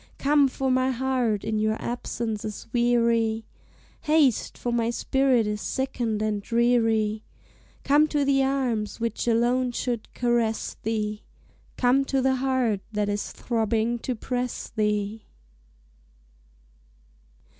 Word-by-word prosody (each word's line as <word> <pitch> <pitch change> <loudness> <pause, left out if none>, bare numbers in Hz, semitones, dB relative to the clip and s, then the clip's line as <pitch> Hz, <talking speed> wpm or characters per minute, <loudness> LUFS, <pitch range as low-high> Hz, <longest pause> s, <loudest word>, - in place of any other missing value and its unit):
Come, 285 0 +4
for 265 0 -1
my 255 0 +2
heart 250 -4 0
in 215 -1 -1
your 215 0 0
absence 235 -3 -3
is 215 -1 -6
weary, 230 -2 +2 0.6
Haste, 300 -6 +2
for 240 - -2
my 230 -1 +1
spirit 260 -1 +2
is 210 0 -3
sickened 240 -5 -2
and 210 -1 -1
dreary, 225 -2 +1 0.6
Come 295 +2 +4
to 295 -2 0
the 275 -1 +3
arms 250 -7 -1
which 230 +1 -2
alone 245 +2 +2
should 240 -2 -3
caress 240 -2 0
thee. 215 -1 -2 0.6
Come 255 +2 +3
to 270 0 0
the 265 0 +2
heart 255 -6 0
that 210 -1 -1
is 205 0 -2
throbbing 230 0 -1
to 250 +1 -3
press 250 +1 -4
thee! 210 0 -1
235 Hz, 125 wpm, -25 LUFS, 220-260 Hz, 0.6 s, Come